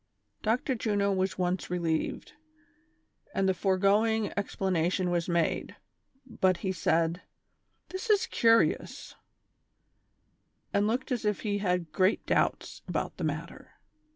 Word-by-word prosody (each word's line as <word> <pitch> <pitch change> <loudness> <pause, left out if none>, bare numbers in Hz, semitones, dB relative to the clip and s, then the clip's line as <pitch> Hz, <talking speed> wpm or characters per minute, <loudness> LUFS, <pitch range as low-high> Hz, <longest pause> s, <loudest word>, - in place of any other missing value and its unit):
Dr. 235 +4 0
Juno 205 -4 0
was 190 0 0
at - - -19
once 180 0 -1
relieved, 170 - -2 1.0
and 195 - +2
the 190 - +3
foregoing 205 +4 +2
expla 195 -1 -2
nation 175 +2 +1
was 175 0 -1
made; 170 -1 0 0.5
but 190 -7 +1
he 190 - +1
said: 170 -1 +1 0.3
" - - -47
That 375 +5 -6
is 415 -2 +4
curious," 230 0 +2 1.6
and 205 +1 +2
looked 250 +5 -2
as 245 - -1
if 210 -1 0
he 205 -2 -1
had 180 -5 -1
great 185 +5 +2
doubts - - 0
about - - -3
the - - -5
matter. - - -5
195 Hz, 130 wpm, -29 LUFS, 180-220 Hz, 1.6 s, is